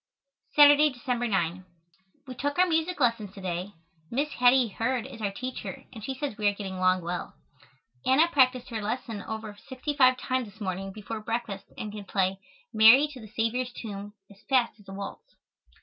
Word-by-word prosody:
Saturday, 290 +1 +8
December 245 -2 -2
9. 185 -3 -1 0.6
We 260 - -7
took 285 +4 -2
our 365 - +6
music 330 0 0
lessons 230 -6 0
to 195 - -9
day. 185 +2 -4 0.4
Miss 285 +5 0
Hattie 250 -2 +4
Heard 235 +4 -1
is 260 -4 -10
our 205 - 0
teacher 255 +4 -6
and 220 -3 -9
she 265 - -3
says 260 -5 -4
we 210 - +2
are 205 - +2
getting 195 -2 -5
along 185 -1 +2
well. 175 +1 -4 0.7
Anna 290 +6 +5
practiced 255 -5 +3
her 225 -3 -3
lesson 220 0 -3
over 220 -1 -6
sixty 260 +3 -3
five 255 -2 +5
times 255 -4 -2
this 215 - -19
morning 195 -1 -3
before 215 +2 -6
breakfast 225 -2 -4
and 215 - -5
can 205 -1 -8
play 190 -1 0 0.3
"Mary 225 +7 +7
to 275 -3 -10
the 215 - -10
Saviour's 230 +4 -1
Tomb" 205 -3 -7 0.2
as 200 +1 -17
fast 245 -5 +2
as 200 - -16
a - - -7
waltz. 200 - -8
230 Hz, 185 wpm, -28 LUFS, 200-260 Hz, 0.7 s, Saturday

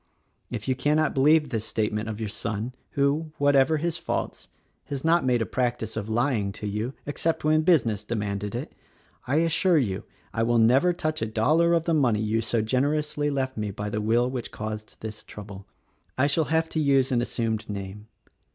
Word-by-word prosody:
If 120 -1 -5
you 130 - +3
cannot 150 +4 +1
believe 150 +3 +4
this 115 -4 -2
statement 110 -1 -2
of 110 0 -5
your 110 - -2
son, 110 +3 -4 0.2
who, 145 +3 0
whatever 145 +2 +4
his 170 +2 -2
faults, - - -3 0.4
has 140 +1 -5
not 170 +1 +4
made 125 -3 +2
a - - -4
practice 120 -3 -2
of 110 -1 -4
lying 110 -3 +1
to 105 - -7
you 105 +6 -3
— - - -36
except 160 +3 -1
when 155 +1 +4
business 120 - +2
demanded 105 -2 -3
it, - - -5 0.3
— - - -31
I 135 - +1
assure 170 +2 +3
you 105 -8 0 0.3
I 115 - -1
will 120 +1 +2
never 125 +10 +5
touch 155 -2 -2
a 110 - 0
dollar 155 +11 +3
of 165 - +1
the 170 - +1
money 125 -9 +3
you 110 +1 0
so 110 0 0
generously 145 +5 0
left 130 -3 -2
me 105 -1 -2
by 105 +1 -5
the 105 - -1
will 115 +3 +2
which 125 -2 -4
caused 110 0 -6
this 110 0 -7
trouble. 100 -1 -10 0.5
"I 130 - +3
shall 150 +2 +2
have 160 +2 +1
to 160 - -2
use 135 -3 +3
an 120 -2 +2
assumed 115 -3 -2
name. 100 +1 -6
120 Hz, 195 wpm, -26 LUFS, 110-150 Hz, 0.5 s, never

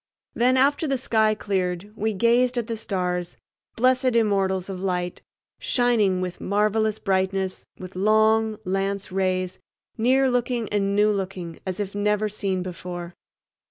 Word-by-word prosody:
Then, 255 +2 +3
after 285 +4 +3
the 275 -1 +1
sky 220 -3 +2
cleared, 190 -1 -2
we 220 +1 -1
gazed 240 +4 +2
at 240 - 0
the 230 0 -3
stars, 180 -4 -3 0.4
blessed 255 +1 +2
immortals 195 -4 +1
of 190 -2 -6
light, 180 -2 -2 0.4
shining 220 -7 +2
with 180 -1 -5
marvelous 215 +1 +1
brightness 190 -1 -1
with 185 0 -10
long 215 +2 +3
lance 195 +1 -2
rays, 185 -1 -1 0.4
near 260 +4 +4
looking 245 -2 0
and 200 -1 0
new 210 +1 +4
looking, 185 -4 -4
as 185 +1 -3
if 200 -1 -3
never 210 +1 +1
seen 195 -3 -2
before. 175 -1 -6
205 Hz, 140 wpm, -24 LUFS, 185-225 Hz, 0.4 s, near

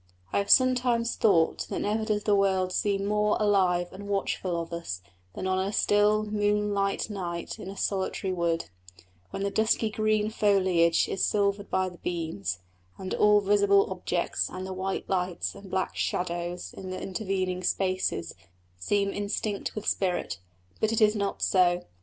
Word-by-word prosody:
I - - +3
have 200 - -2
sometimes 250 -2 +4
thought 175 -7 +2
that - - -3
never 215 +2 0
does 210 -2 0
the 210 - +3
world 190 -2 +1
seem 200 -1 0
more 210 0 +2
alive 185 -4 +2
and 200 +2 -9
watchful 190 -3 -1
of 165 0 -6
us 170 - -4 0.4
than - - -4
on 185 0 +1
a 190 +1 -1
still, 210 +1 +3
moonlight 210 -1 0
night 175 -4 -5
in 185 - -7
a 195 - -8
solitary 190 -1 -1
wood, 170 -2 0 0.6
when 195 - -4
the 200 - -1
dusky 220 +1 +1
green 215 0 +1
foliage 185 -6 +3
is 195 - -2
silvered 200 0 +1
by 185 0 +1
the 180 -1 -10
beams, 160 - -3 0.4
and 190 -1 -5
all 210 0 +5
visible 200 -1 +3
objects 180 -1 -1
and 185 0 -6
the 190 - -5
white 190 +1 -3
lights 180 -2 -1
and 200 -1 -12
black 190 0 -1
shadows 175 0 -3
in 190 - -8
the 185 - -4
intervening 185 -2 -2
spaces 185 - -1 0.5
seem 200 - 0
instinct 205 0 -3
with 215 - -5
spirit. 180 - -1 0.4
But 220 - +1
it 225 - +1
is 215 -1 +4
not 200 -1 -2
so. 180 -2 +3
195 Hz, 165 wpm, -27 LUFS, 180-210 Hz, 0.6 s, all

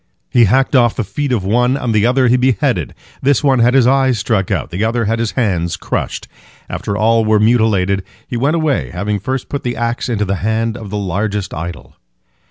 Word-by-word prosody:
He 120 -2 +5
hacked 130 +7 +2
off 120 -3 +4
the 120 - -1
feet 130 +8 -3
of 115 -6 0
one, 125 +6 +2
and 120 -4 -2
the 110 +1 +3
other 130 +1 +3
he 120 - +4
beheaded. 125 -4 0 0.3
This 140 +1 +2
one 135 -3 +3
had 120 +2 +3
his 130 -3 +5
eyes 130 -1 +3
struck 95 -2 -1
out, - - -2
the 90 +5 -2
other 115 +1 0
had 115 +2 0
his 115 -2 -2
hands 90 -9 -1
crushed. - - -4 0.4
After 100 - -4
all 115 +1 +3
were 110 -1 +3
mutilated, 105 -4 +2 0.2
he - - -5
went 140 +7 +1
away, 145 - 0
having 100 +8 -2
first 130 +6 -3
put 140 - -4
the 120 0 -3
axe 120 +2 -2
into 105 -3 0
the 100 0 -1
hand 110 +2 -1
of 105 - -8
the 105 - -3
largest 100 0 -2
idol. 85 +2 -7
115 Hz, 210 wpm, -16 LUFS, 100-125 Hz, 0.4 s, He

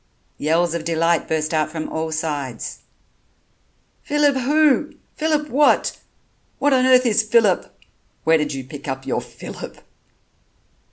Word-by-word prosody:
Yells 165 +3 +1
of 170 -1 -3
delight 165 0 +1
burst 155 0 -1
out 155 -1 +1
from 160 -1 -4
all 160 0 -3
sides. 145 -6 -4 1.2
"Phillip 295 -1 +2
who?... 295 +3 +2 0.2
Phillip 305 -1 0
what? 290 +4 +3 0.6
What 285 0 +2
on 255 0 +3
earth 255 0 +5
is 225 -2 +3
Phillip? 220 -3 +2 0.5
Where 160 0 +4
did 150 -1 -1
you 135 -2 -5
pick 145 +3 -10
up 135 0 -4
your - - -1
Phillip?" - - -10
170 Hz, 130 wpm, -21 LUFS, -, 1.2 s, earth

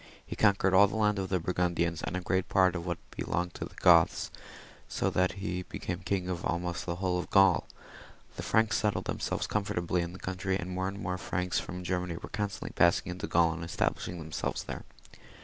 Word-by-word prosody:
He - - -6
conquered 100 -2 +3
all 100 +2 +8
the 105 - -6
land 105 -2 +2
of 95 -1 -3
the 95 - +1
Burgundians, 85 -1 0
and 90 - -2
a - - -3
great 95 +1 0
part 95 -1 +4
of 85 0 -4
what 85 -1 -1
belonged 90 0 -2
to - - -5
the - - -13
Goths, 85 -1 +4 0.6
so - - -1
that 90 0 +2
he 95 -2 -3
became 90 0 -5
king 90 +1 -1
of 90 -2 -3
ahnost 85 0 -2
aU - - 0
the - - -2
whole 90 0 0
of - - -5
GauL 95 -3 +5 0.7
The - - -5
Franks 110 0 +2
settled 105 -2 0
themselves - - -2
comfortably 90 -4 0
in 85 0 -4
the - - -8
country, 95 0 -2
and 90 -1 -5
more 95 +1 -1
and 100 +1 -5
more 90 -1 -3
Franks 90 0 -1
from 90 +1 -6
Germany 90 -1 -2
were - - -8
constantly 100 -2 -3
passing 85 +1 +3
into 90 +3 -5
Gaul 85 -1 +3
and 85 0 -6
establish 85 - -1
ing 90 - -5
themselves 80 -1 -3
there. - - -7
90 Hz, 215 wpm, -30 LUFS, 85-95 Hz, 0.7 s, all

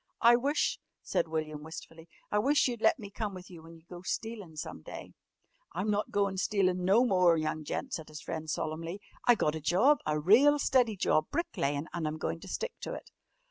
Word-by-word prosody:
"I 235 0 +7
wish," 275 +5 0 0.2
said - - 0
William 155 -2 -3
wistfully, 165 +1 -10 0.2
"I 210 - +3
wish 280 +7 +3
you'd 240 -3 -4
let 320 - +4
me 205 -5 -9
come 210 -2 -4
with 185 0 -10
you 170 -2 -11
when 165 +1 -13
you 165 - -18
go 175 -1 -9
stealin' 200 -4 -5
some 150 - -6
day!" - - -9 0.6
"I'm 190 +6 -1
not 205 0 0
goin' 200 -1 0
stealin' 185 -3 +1
no 205 +7 +5
more, 180 -6 +4
young 155 0 -2
gent," 260 - -4
said 160 - -4
his 155 -1 -9
friend 160 -1 -5
solemnly. 165 +5 -3 0.3
"I 245 - +8
got 150 -8 +1
a 160 - -5
job 235 - +4
a 150 0 +1
real 245 - +6
steady 255 -6 +2
job 155 -4 +2
brick 340 - -2
layin', 140 +2 -1
an' 170 -3 -2
I'm 155 +1 -3
goin' 165 - -3
to 195 - -11
stick 475 - -3
to - - -5
it." - - -11
185 Hz, 215 wpm, -31 LUFS, 160-225 Hz, 0.6 s, I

